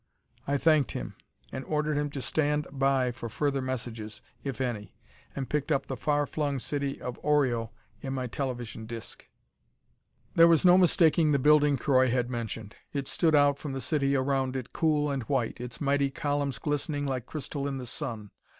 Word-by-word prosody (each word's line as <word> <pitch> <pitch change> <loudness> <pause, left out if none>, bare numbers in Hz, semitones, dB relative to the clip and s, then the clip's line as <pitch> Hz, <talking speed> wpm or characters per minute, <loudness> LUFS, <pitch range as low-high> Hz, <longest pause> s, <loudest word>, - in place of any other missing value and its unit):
I 140 +1 +2
thanked 155 -3 +3
him - - -5 0.4
and 130 - -5
ordered 150 0 0
him 145 0 0
to 140 -2 -5
stand 150 -1 +1
by 135 -2 +2
for 120 -1 -7
further 140 +3 0
messages, 115 -4 -5 0.2
if 135 -3 -4
any, 115 -6 -3 0.4
and 135 -2 -3
picked 150 +1 -1
up 140 -2 +1
the 135 - -4
far 145 +3 +1
flung 145 -2 -2
city 140 +1 -2
of 125 -1 -6
Oreo 130 -7 +2 0.3
in 135 - -4
my 130 -1 -2
television 120 -3 -4
disc. 115 0 -8 1.1
There 165 0 +7
was 165 0 +4
no 180 0 +8
mistaking 165 -4 +4
the - - +4
building 150 0 +4
Croy 130 0 +3
had 125 0 0
mentioned. 115 -2 -5 0.2
It 140 -2 -2
stood 160 -2 +2
out 145 -1 +4
from 145 -3 -5
the 135 - -3
city 140 -1 +1
around 135 -1 0
it, 130 -1 -5
cool 150 -3 +1
and 135 -1 -1
white, 125 -4 -1
its 125 -1 -7
mighty 140 -1 +2
columns 145 -2 -1
glistening 145 0 -2
like 130 -4 -3
crystal 140 -2 -4
in 135 -1 -3
the 130 - -6
sun. 115 -5 -5
140 Hz, 180 wpm, -28 LUFS, 125-145 Hz, 1.1 s, no